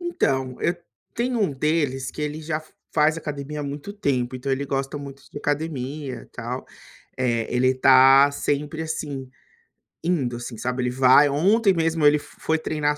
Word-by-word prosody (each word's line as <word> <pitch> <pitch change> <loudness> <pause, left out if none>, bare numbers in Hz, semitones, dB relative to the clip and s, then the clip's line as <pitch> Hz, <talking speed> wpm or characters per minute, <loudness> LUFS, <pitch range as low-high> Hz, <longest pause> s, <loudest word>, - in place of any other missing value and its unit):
Então, 135 - -1
e 175 +1 +1 0.4
tem 245 +1 -1
um 200 -10 +1
deles 135 -3 0
que 150 - -6
ele 150 +1 -3
já 155 0 -2
f 155 - -17 0.2
faz 155 +1 +3
academia 150 -1 -5
há - - -3
muito 145 +7 -6
tempo, 130 -10 -1
então 130 +2 -4
ele 135 +1 0
gosta 135 +1 -2
muito 140 -1 -9
de - - -7
academia 145 -2 -3
e - - -15
tal. 125 +2 -6 0.5
Eh, 120 -3 0
ele 130 +1 +3
tá 135 +2 +7
sempre, 150 +3 -2
assim, 145 -4 -4 0.8
indo, 140 -9 0
assim, 120 -1 -7
sabe. 125 +2 -2
Ele 125 - 0
vai 130 +3 +6
Ontem 195 +8 +3
mesmo 165 -2 +1
ele 145 +1 +6
f - - -12
foi 160 0 +1
treinar 150 -2 -1
145 Hz, 175 wpm, -23 LUFS, 130-155 Hz, 0.8 s, tá